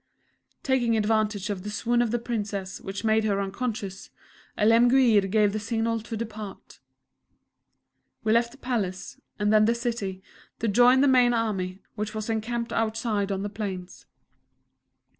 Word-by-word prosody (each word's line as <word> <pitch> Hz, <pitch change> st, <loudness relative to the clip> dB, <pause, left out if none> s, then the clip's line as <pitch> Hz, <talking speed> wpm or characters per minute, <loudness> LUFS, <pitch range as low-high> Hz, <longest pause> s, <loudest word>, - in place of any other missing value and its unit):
Taking 240 Hz, -4 st, +2 dB
advantage 210 Hz, -1 st, 0 dB
of 195 Hz, -3 st, -4 dB
the 210 Hz, -, -6 dB
swoon 240 Hz, +3 st, +1 dB
of 240 Hz, -, +1 dB
the 240 Hz, -, 0 dB
Princess, 205 Hz, -5 st, -4 dB
which 195 Hz, +2 st, -6 dB
made 220 Hz, 0 st, +3 dB
her 200 Hz, -2 st, +1 dB
unconscious, 200 Hz, -1 st, -4 dB, 0.5 s
Alemguir 230 Hz, +1 st, +5 dB
gave 210 Hz, 0 st, +3 dB
the 215 Hz, -, -1 dB
signal 230 Hz, +1 st, -1 dB
to 225 Hz, +1 st, -6 dB
depart. 215 Hz, -3 st, -8 dB, 1.4 s
We 215 Hz, -, +1 dB
left 235 Hz, 0 st, +2 dB
the 275 Hz, -, -15 dB
Palace, 215 Hz, -9 st, -3 dB, 0.2 s
and 210 Hz, 0 st, +1 dB
then 215 Hz, 0 st, +6 dB
the 230 Hz, +2 st, +2 dB
City, 225 Hz, -6 st, -3 dB, 0.3 s
to 230 Hz, -, -2 dB
join 245 Hz, +5 st, +5 dB
the 285 Hz, -, +5 dB
main 250 Hz, -2 st, +5 dB
army, 195 Hz, -4 st, -2 dB
which 210 Hz, 0 st, -4 dB
was 215 Hz, +1 st, -3 dB
encamped 235 Hz, +2 st, -2 dB
outside 220 Hz, -2 st, -1 dB
on 195 Hz, 0 st, -2 dB
the -, -, -2 dB
plains. 195 Hz, -4 st, -6 dB
220 Hz, 150 wpm, -26 LUFS, 205-235 Hz, 1.4 s, then